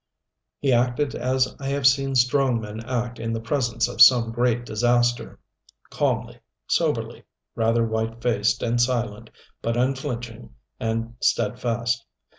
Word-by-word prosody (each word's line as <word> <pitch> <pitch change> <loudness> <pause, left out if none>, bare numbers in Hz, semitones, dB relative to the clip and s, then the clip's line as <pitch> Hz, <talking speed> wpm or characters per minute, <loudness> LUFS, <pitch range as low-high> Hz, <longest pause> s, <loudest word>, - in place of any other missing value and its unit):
He 135 -3 +1
acted 125 +4 +1
as 130 +1 0
I 135 - -5
have 140 -1 -1
seen 135 0 +3
strong 125 0 +2
men 105 0 -7
act 120 0 -3
in 115 0 -3
the 115 - -2
presence 120 0 -1
of 110 - -3
some 120 -2 +7
great 120 0 0
disaster 120 +2 0 0.5
calmly, - - -1 0.3
soberly, - - -1 0.3
rather 115 +1 +1
white 110 +1 -3
faced 115 -2 0
and 120 0 +1
silent, 115 -3 -1 0.3
but 115 +1 -1
unflinching 120 - -3 0.2
and 115 +1 -2
steadfast. 115 +2 0
120 Hz, 130 wpm, -24 LUFS, 115-125 Hz, 0.5 s, some